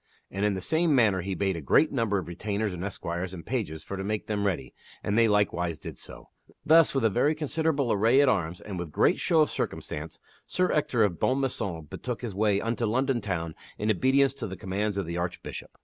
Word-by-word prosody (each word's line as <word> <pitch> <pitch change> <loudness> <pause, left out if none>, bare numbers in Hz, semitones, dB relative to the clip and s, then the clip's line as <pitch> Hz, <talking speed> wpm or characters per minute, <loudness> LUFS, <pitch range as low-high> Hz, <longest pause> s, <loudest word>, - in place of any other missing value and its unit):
And 100 +2 -3
in 105 -1 +2
the 95 - -4
same 160 - +2
manner 105 -7 +3
he 95 +1 -3
bade 95 +1 0
a 85 - -5
great 150 - +4
number 115 -6 +1
of 95 - -4
retainers 100 +3 -2
and 90 0 -5
esquires 90 -1 -4
and 85 -3 -9
pages 100 -10 -3
for 100 - -6
to 95 - -3
make 105 +1 -2
them 100 -1 -1
ready, 70 -10 -3 0.3
and 100 - 0
they 115 0 +5
likewise 90 -6 +1
did - - -9
so. - - -11 0.4
Thus, 160 -1 +5
with 135 - +2
a - - +5
very 145 +8 +2
considerable 150 -3 0
array 115 +6 +4
at 145 - +5
arms 90 -8 0
and 95 -4 -6
with 85 -3 -5
great - - +3
show 165 -2 +3
of 150 - +2
circumstance, 75 +2 -4 0.3
Sir 180 0 +1
Ector 130 -6 +2
of 95 -5 0
Bonmaison 110 - -1
betook 125 - -5
his 115 -4 -4
way 100 0 +2
unto 115 +1 -1
London 130 +2 +1
Town 85 -5 -3 0.2
in 105 +1 +1
obedience 135 +6 +3
to 130 -5 -5
the 95 -1 -7
commands 100 +3 -2
of 100 - -1
the 85 +1 -4
Archbishop. 85 +1 -5
105 Hz, 220 wpm, -27 LUFS, 90-130 Hz, 0.4 s, they